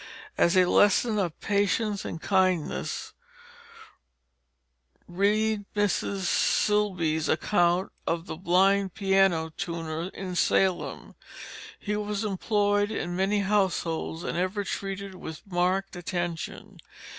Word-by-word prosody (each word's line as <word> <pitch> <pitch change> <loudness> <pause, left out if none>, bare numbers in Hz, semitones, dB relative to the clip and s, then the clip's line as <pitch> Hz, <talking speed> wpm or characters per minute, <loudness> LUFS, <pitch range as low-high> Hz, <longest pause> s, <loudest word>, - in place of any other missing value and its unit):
As 170 +2 +3
a 185 - +6
lesson 205 +4 +3
of 175 -5 -2
patience 205 0 0
and 165 - -5
kindness, 185 -3 0 1.9
read 205 +3 +1
Mrs. 200 -1 0
Silsbee's 180 -4 +1
account 175 +1 +2 0.2
of 165 0 -1
the 160 - -6
blind 190 +2 +2
piano 195 -5 +2
tuner 165 -2 -4
in 185 -2 -5
Salem. 175 -6 0 0.7
He 210 - -2
was 210 0 -2
employed 205 0 +1
in 175 -5 -3
many 195 +2 +1
households 180 -5 0
and - - -3
ever 185 +3 -1
treated 195 0 -5
with 160 -1 -9
marked 185 +1 0
attention. 175 -1 -5
190 Hz, 105 wpm, -27 LUFS, 175-205 Hz, 1.9 s, a